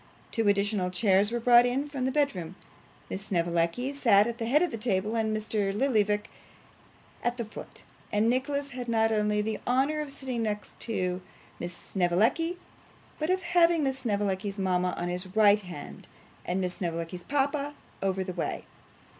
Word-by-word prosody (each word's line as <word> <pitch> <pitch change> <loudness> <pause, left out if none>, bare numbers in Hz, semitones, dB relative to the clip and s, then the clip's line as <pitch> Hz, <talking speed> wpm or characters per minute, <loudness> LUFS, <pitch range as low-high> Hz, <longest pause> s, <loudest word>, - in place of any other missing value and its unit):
Two 225 -2 0
additional 200 -2 +2
chairs 195 +2 +3
were 240 - -1
brought 240 +1 +7
in 270 +4 -1
from 275 -3 -3
the 260 - +1
bedroom: 200 - -1 0.5
Miss 195 +2 -5
Snevellicci 170 +8 0
sat 230 -8 +5
at 235 +1 -4
the 225 - -2
head 295 +8 +4
of 355 - 0
the - - -3
table, 210 -1 0
and 220 -1 +1
Mr. 210 -2 -1
Lillyvick 210 -3 +1 1.0
at 240 0 0
the 235 - -3
foot; 215 - -10 0.3
and 210 +2 +2
Nicholas 280 +3 0
had 245 -1 -6
not 225 -1 +2
only 210 -1 +1
the 220 0 -2
honour 275 +5 +2
of 295 -2 -5
sitting 260 -4 -3
next 210 +1 -4 0.7
Miss 175 0 -6
Snevellicci, 215 - +1 0.6
but 310 +2 -1
of 370 0 +1
having 345 -2 +4
Miss 265 -1 -1
Snevellicci's 205 -4 -1
mama 180 -2 +1
on 175 - -2
his 180 +2 -3
right 210 -1 +6
hand, 180 -6 -9 0.4
and 180 +2 -1
Miss 180 -1 -1
Snevellicci's 170 -1 -3
papa 285 +4 -1 0.3
over 190 -1 0
the 185 -1 -5
way. 170 - -3
215 Hz, 165 wpm, -28 LUFS, 190-260 Hz, 1.0 s, brought